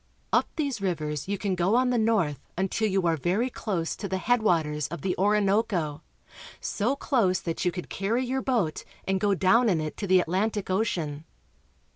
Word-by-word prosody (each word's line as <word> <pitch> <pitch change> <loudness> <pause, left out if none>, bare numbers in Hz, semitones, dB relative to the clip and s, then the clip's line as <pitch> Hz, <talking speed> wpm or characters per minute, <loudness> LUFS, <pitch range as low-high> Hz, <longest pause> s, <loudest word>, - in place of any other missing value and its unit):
Up - - +4
these 280 -9 -2
rivers 155 -6 -2
you 200 +1 -1
can 195 -1 -1
go 180 +4 +2
on 250 0 +3
the 245 - +2
north 200 - +1 0.2
until 195 +4 0
you 190 -2 +1
are 165 -1 +3
very 190 - 0
close 180 -9 -2
to 200 - -4
the 190 0 -1
head 245 +5 +2
waters 150 -7 +1
of 170 -1 -7
the 185 -2 0
Orinoco 200 -6 +1 0.3
— - - -15
so 235 +7 -1
close 215 -11 +1
that 165 0 -3
you 180 - +3
could 180 0 -6
carry 225 +6 -1
your 265 +2 -1
boat 225 -13 0 0.2
and 190 0 +1
go 200 0 +2
down 195 +6 +4
in 175 -5 +2
it 155 -1 -4
to 200 - -3
the 185 0 +5
Atlantic 190 +3 -1
Ocean. 165 -7 -1
190 Hz, 195 wpm, -27 LUFS, 170-220 Hz, 0.3 s, the